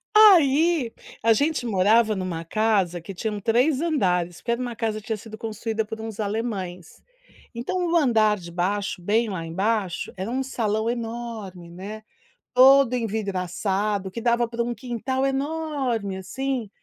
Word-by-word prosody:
Aí, 330 - +6 0.3
a 225 0 +6
gente 285 +2 0
morava 215 +1 +3
numa 180 -3 -4
casa 195 -3 +1
que 190 +3 -8
tinham 210 +2 -3
3 255 +8 +2
andares, 180 - 0
porque 235 - -2
era 235 - 0
uma 245 -2 -4
casa 220 -1 -2
que 215 - -17
tinha 220 - -1
sido 220 +1 -10
construída 220 0 -2
por 220 +1 -7
uns 220 -1 -7
alemães. 200 -5 -4 0.5
Então 355 +9 -2
o 345 - +2
andar 220 -7 +3
de 170 -3 -10
baixo, 190 +2 -1
bem 220 +5 +1
lá 185 -4 -4
embaixo, 190 +1 -1
era 190 +3 -4
um 260 +2 -1
salão 220 -4 -1
enorme, 225 -6 -5
né, 205 +5 -8 0.5
todo 265 0 +7
envidraçado, 200 -2 -1
que 230 - -6
dava 235 0 +2
para 235 0 -2
um 240 0 -2
quintal 260 +2 -2
enorme, 270 -7 -2
assim. 245 +5 -3
220 Hz, 155 wpm, -24 LUFS, 195-245 Hz, 0.5 s, todo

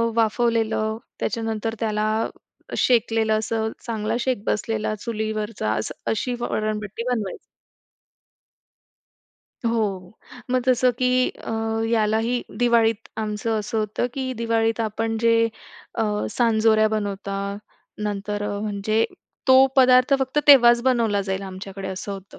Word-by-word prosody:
वाफवलेलं, 225 -1 +1 0.2
त्याच्यानंतर 225 -1 -2
त्याला 215 -1 0 0.7
शेकलेलं, 225 -2 +2
असं 220 0 -2
चांगला 220 -2 -2
शेक 245 -4 -1
बसलेला 215 0 -1
चुलीवरचा 215 - -3
असं, 110 - -3 0.2
अशी 245 +3 -1
वरणभट्टी 215 -1 -2
बनवायचो. 215 -6 -2 2.3
हो, 205 -4 -2 0.3
मग 255 -1 +2
जसं 255 0 +4
की 255 0 +3 0.2
अ, - - -5 0.4
यालाही 225 +2 +1 0.2
दिवाळीत 230 -2 +2
आमचं 220 +1 -2
असं 215 +1 -3
होतं 215 +3 -1
की 260 -2 -2
दिवाळीत 225 0 +1
आपण 225 +1 -1
जे 230 0 +4 0.5
अ, 230 - 0 0.3
सांजोऱ्या 220 -2 +3
बनवता, 200 -1 -3 0.5
नंतर 205 0 -3
अ, 205 -1 -2
म्हणजे 215 +1 0 0.4
तो 260 +1 +8
पदार्थ 255 +1 +6
फक्त 265 +2 -1
तेव्हाच 240 -4 +8
बनवला 230 -6 +2
जाईल 190 0 -3
आमच्याकडे 195 0 -7
असं 190 +2 -5
होतं. 195 0 -10
220 Hz, 115 wpm, -23 LUFS, 210-235 Hz, 2.3 s, तो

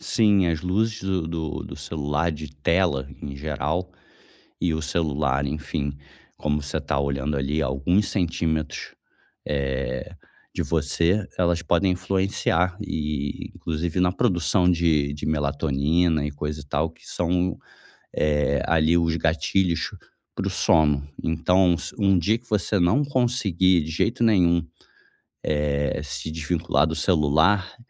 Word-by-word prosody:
Sim, 105 -5 +3
as 80 -2 0
luzes 110 +5 0
do 95 -4 -1
do 80 -2 -4
do - - -8
celular, 75 +2 -1
de 75 -1 -7
tela 85 -7 +2 0.2
em 70 -1 -6
geral, 75 +5 -2 0.7
e 85 -3 +1
o 80 - -2
celular, 75 -3 0
enfim, 70 0 -3 0.4
como 75 -1 -1
você 70 -1 -3
tá - - -2
olhando 70 +1 -1
ali 70 +3 -1
a - - +1
alguns 85 +10 +1
centímetros, 80 -4 -2 0.5
eh, 65 -3 -2 0.4
de - - 0
você, 85 +5 +1
elas 85 -1 +2
podem 90 +2 +2
influenciar 95 -1 0
e 75 -6 -3
inclusive 80 +2 -2
na 90 0 +3
produção 90 -4 +2
de 80 -4 +2
de 75 - -6
melatonina 75 +2 +1
e 75 - -3
coisa 75 +1 -4
e - - -11
tal, 75 +3 0
que - - -22
são, 90 +1 0 0.6
eh, 75 -2 +1
ali 80 +1 +3
os 85 -1 +1
gatilhos 85 +1 +1 0.5
para - - -2
o - - 0
sono. 75 -2 +2 0.2
Então, 90 +3 +3
s 85 - -5
um 100 -2 +4
dia 110 +7 +2
que 120 - -26
você 105 -1 +1
não 90 +12 +3
conseguir 100 - +2
de 80 - -6
jeito 115 +9 0
nenhum, 85 -7 +4 1.1
eh, 70 +1 -1
se 75 +2 -5
desvincular 80 -1 0
do 80 - -2
celular, 85 - +2
80 Hz, 140 wpm, -24 LUFS, 75-90 Hz, 1.1 s, um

